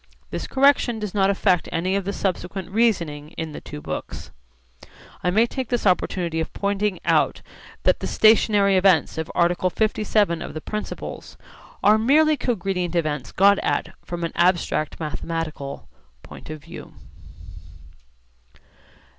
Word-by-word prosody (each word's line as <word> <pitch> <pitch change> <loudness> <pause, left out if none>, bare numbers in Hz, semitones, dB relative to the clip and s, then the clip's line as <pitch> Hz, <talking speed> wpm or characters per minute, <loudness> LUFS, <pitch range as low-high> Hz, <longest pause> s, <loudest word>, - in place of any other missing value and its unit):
This - - -4
correction 270 -3 +3
does 210 -3 -5
not 195 -2 +3
affect 190 -3 +1
any 185 +3 0
of 200 -2 -1
the 200 - -1
subsequent 190 -1 -3
reasoning 170 -9 0
in 160 -1 -4
the - - -8
two 150 0 -9
books. - - -6 0.9
I 180 - +2
may 215 +6 +4
take 255 0 -5
this 245 -3 -1
opportunity 175 -3 +1
of 160 - -3
pointing 200 -1 -1
out - - +2 0.4
that - - +3
the - - -3
'stationary 210 -3 +4
events' 180 -4 +3
of 160 - -4
article 175 +1 +2
57 210 -3 +1
of - - -7
the - - -3
Principles 210 +6 -6 0.5
are 210 +2 +5
merely 305 +7 +4
cogredient 190 - -2
events 150 -5 -1
got 200 +1 +4
at - - -1
from 175 -1 -5
an 165 - -2
abstract 170 -4 +1
mathematical 155 -2 -5 0.4
point - - -12
of 155 -2 -8
view. - - -11
185 Hz, 140 wpm, -23 LUFS, 165-210 Hz, 0.9 s, are